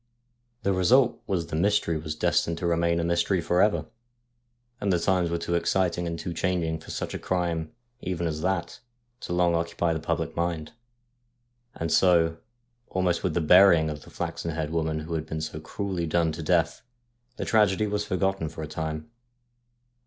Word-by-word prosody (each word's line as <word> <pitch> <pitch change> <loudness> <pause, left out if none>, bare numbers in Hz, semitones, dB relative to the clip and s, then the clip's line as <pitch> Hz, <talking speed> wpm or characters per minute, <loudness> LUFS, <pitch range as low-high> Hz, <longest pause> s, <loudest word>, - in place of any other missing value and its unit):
The 100 - +2
result 120 +8 +3
was 90 -4 0
the 80 - -5
mystery 100 -1 +2
was 75 0 -4
destined 85 +1 +1
to 85 - -4
remain 85 0 +2
a - - 0
mystery 85 +2 +1
for 90 +2 +2
ever; 105 - +2 0.9
and 100 - 0
the 90 - +3
times 90 0 +1
were 85 - 0
too 85 +1 -3
exciting 85 0 +1
and 85 0 -3
too 85 - -4
changing 85 -3 -1
for - - -14
such - - -4
a - - -4
crime 85 -3 -1 0.3
even 85 -2 -2
as 80 -2 -2
that 95 0 -2 0.4
to - - -7
long 90 -1 +3
occupy 85 0 0
the 80 - -2
public - - -2
mind, 85 -2 -2 1.0
and 80 -1 -3
so, 85 -3 +4 0.5
almost 90 -2 0
with 90 -5 -1
the 85 - +2
burying 85 -1 +6
of 75 0 -7
the - - -14
flaxen 85 - -4
haired 80 -1 -3
woman 80 -1 -1
who 80 +2 -6
had 80 -1 -3
been 80 0 -4
so 80 0 -5
cruelly 90 +1 -3
done 80 0 +2
to 80 +2 -6
death, 80 0 +1 0.6
the - - -3
tragedy 105 -2 +3
was 105 0 -1
forgotten 95 -4 -1
for 80 0 -7
a - - -4
time. 80 0 -4
85 Hz, 180 wpm, -26 LUFS, 80-90 Hz, 1.0 s, burying